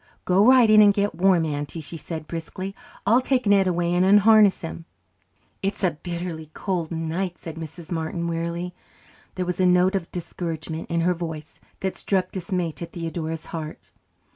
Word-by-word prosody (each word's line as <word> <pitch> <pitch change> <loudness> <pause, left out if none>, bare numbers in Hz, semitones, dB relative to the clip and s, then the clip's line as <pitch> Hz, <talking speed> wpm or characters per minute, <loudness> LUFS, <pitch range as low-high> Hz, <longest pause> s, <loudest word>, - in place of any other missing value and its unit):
"Go 185 +2 +4
right 255 -2 +7
in 215 0 +7
and 205 -1 +7
get 205 0 +1
warm, 180 -2 +3
Auntie," 145 +1 -4
she 160 +2 -8
said 160 -1 -6
briskly. 180 +4 -6 0.3
"I'll 235 +5 +5
take 255 -1 +1
Ned 200 -2 +4
away 175 -1 +1
and 180 +1 +3
unharness 205 +1 +6
him." 165 0 -7 0.8
"It's 195 +1 -2
a 185 - +4
bitterly 170 -3 -5
cold 180 -5 -2
night," 170 +2 -3
said 165 - -8
Mrs. 165 +2 -9
Martin 170 +1 -2
wearily. 170 +1 -3 0.6
There 185 - -2
was 180 +1 -3
a 185 - +4
note 180 +2 +4
of 190 -4 -2
discouragement 165 -2 -5
in 170 0 +1
her 180 +2 +3
voice 160 -3 -7 0.2
that 190 -1 -2
struck 185 -2 -1
dismay 180 -2 -2
to 170 +2 -7
Theodora's 165 -2 -5
heart. 160 -2 -7
175 Hz, 170 wpm, -24 LUFS, 165-190 Hz, 0.8 s, right